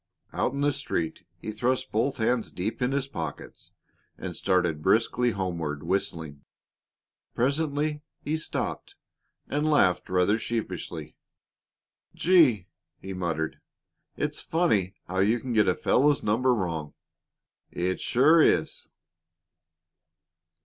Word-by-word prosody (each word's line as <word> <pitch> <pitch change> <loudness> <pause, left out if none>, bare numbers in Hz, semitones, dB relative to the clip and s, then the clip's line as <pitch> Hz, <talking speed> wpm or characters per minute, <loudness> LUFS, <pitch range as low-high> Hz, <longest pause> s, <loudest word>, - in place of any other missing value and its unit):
Out 125 - 0
in 140 - -3
the 145 0 +2
street 90 - -3
he 110 - -6
thrust 120 +4 -1
both 115 +6 0
hands 115 0 +1
deep 100 +7 -4
in 125 +1 +1
his 140 0 0
pockets 80 - -7 0.5
and - - -6
started 90 -5 +1
briskly 115 +6 +2
homeward, 85 -8 -3
whistling. 80 -5 -2 0.9
Presently 150 +3 0 0.2
he 150 - -2
stopped 160 - -4 0.5
and 150 +2 0
laughed 90 -12 +3
rather 95 +4 +2
sheepishly. 115 0 -4 1.0
"Gee!" 150 - +4 0.3
he 95 - -7
muttered. 85 -3 -2 0.6
"It's 150 0 -2
funny 105 - +1
how 95 +2 -2
you 110 +5 +3
can 125 0 -4
get 110 -2 +4
a 90 - +3
fellow's 145 +2 +2
number 120 +4 +2
wrong 85 -7 -3 0.7
it 90 +1 -2
sure 155 +7 +5
is!" 85 - +1
110 Hz, 115 wpm, -27 LUFS, 90-140 Hz, 1.0 s, sure